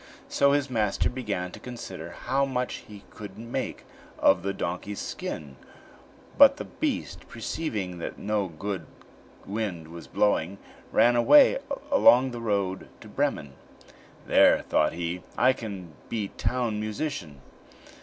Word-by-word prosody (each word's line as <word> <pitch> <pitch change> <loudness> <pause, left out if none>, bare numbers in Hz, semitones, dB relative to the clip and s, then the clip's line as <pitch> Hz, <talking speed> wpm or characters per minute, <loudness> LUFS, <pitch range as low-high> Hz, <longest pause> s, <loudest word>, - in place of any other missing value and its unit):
So 140 0 +4
his 145 -1 +2
master 110 -5 0
began 105 -8 -3
to - - -10
consider 95 -9 -7 0.2
how 135 +3 +2
much 125 -2 -2
he 105 -2 -12
could 105 -2 -10
make 115 +2 -4 0.3
of 90 -2 +4
the 100 +2 -1
donkey's 95 +2 -4
skin, 70 -3 -5 0.8
but - - +8
the - - -5
beast, - - -3
perceiving 100 - -4
that - - -5
no 105 -1 -1
good 90 0 -5 0.6
wind 95 -6 -4
was 85 0 -10
blowing, 100 -2 +1 0.3
ran 120 +1 +5
away 270 - +7 0.3
along 130 - +6
the 120 -1 -6
road 100 -4 -1
to - - -12
Bremen. 70 -2 -1 0.7
"There," - - +5
thought 75 - +2
he, 85 +1 -3 0.2
"I 130 +2 +5
can 95 -9 -7 0.2
be 105 -4 -2
town 120 -4 -1
musician." 105 - -4
105 Hz, 135 wpm, -27 LUFS, 90-120 Hz, 0.8 s, but